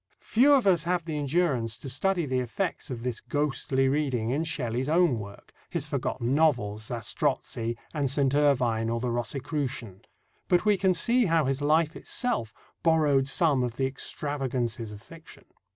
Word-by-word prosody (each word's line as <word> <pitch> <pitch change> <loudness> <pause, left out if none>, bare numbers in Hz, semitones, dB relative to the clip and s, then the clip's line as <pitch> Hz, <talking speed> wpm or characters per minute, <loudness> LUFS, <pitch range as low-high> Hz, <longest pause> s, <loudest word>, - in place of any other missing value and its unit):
Few 260 +6 +4
of 270 -5 +4
us 175 -5 +3
have 175 -1 0
the 160 -2 -4
endurance 140 -6 0
to - - -9
study 175 +6 0
the 130 -2 0
effects 155 - -3
of 120 -3 -5
this 125 -2 -3
ghostly 135 -2 0
reading 130 -5 0
in 145 +5 0
Shelley's 130 -4 -2
own 165 -7 +3
work 100 -1 -11 0.2
his - - -3
forgotten 120 +3 -2
novels, 125 -9 +1
Zastrossi, 120 -1 -2 0.2
and 145 -4 0
St. 140 0 +2
Irvyne 125 -6 +2
or 115 0 -1
the 125 0 -2
Rosicrucian 125 - -3 0.5
but 180 +3 +2
we 210 -1 +5
can 190 -1 +2
see 235 +6 +3
how 165 -3 +2
his 135 +1 -1
life 155 +2 +2
itself 230 - -2 0.3
borrowed 150 -5 +3
some 140 -1 +2
of 120 -2 -2
the 135 - 0
extravagances 130 -4 -3
of 105 +1 -11
fiction. 165 -1 -14
140 Hz, 165 wpm, -27 LUFS, 120-160 Hz, 0.5 s, we